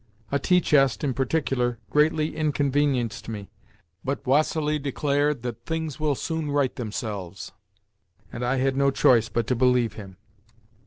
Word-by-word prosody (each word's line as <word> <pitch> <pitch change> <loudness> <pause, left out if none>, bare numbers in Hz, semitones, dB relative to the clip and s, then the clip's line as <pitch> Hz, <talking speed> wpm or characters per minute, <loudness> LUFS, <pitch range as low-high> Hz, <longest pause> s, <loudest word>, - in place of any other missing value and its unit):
A 140 - +1
tea 180 +5 +3
chest, 135 -6 +3
in 140 -3 0
particular, 130 -3 0
greatly 155 +1 +2
inconvenienced 140 -6 0
me, 105 -3 -7 0.5
but 135 +1 -3
Vassili 150 +2 +2
declared 145 -1 0
that 120 -1 -6
"things 160 -2 -3
will 150 -2 +1
soon 160 +1 -3
right 140 -3 +1
themselves," 105 -5 -5 0.8
and 120 - -4
I 125 +2 +1
had 135 0 +1
no 140 0 +3
choice 115 -4 +4
but 115 -1 -1
to 125 - 0
believe 125 -2 +2
him. 95 -3 -10
135 Hz, 145 wpm, -25 LUFS, 120-150 Hz, 0.8 s, choice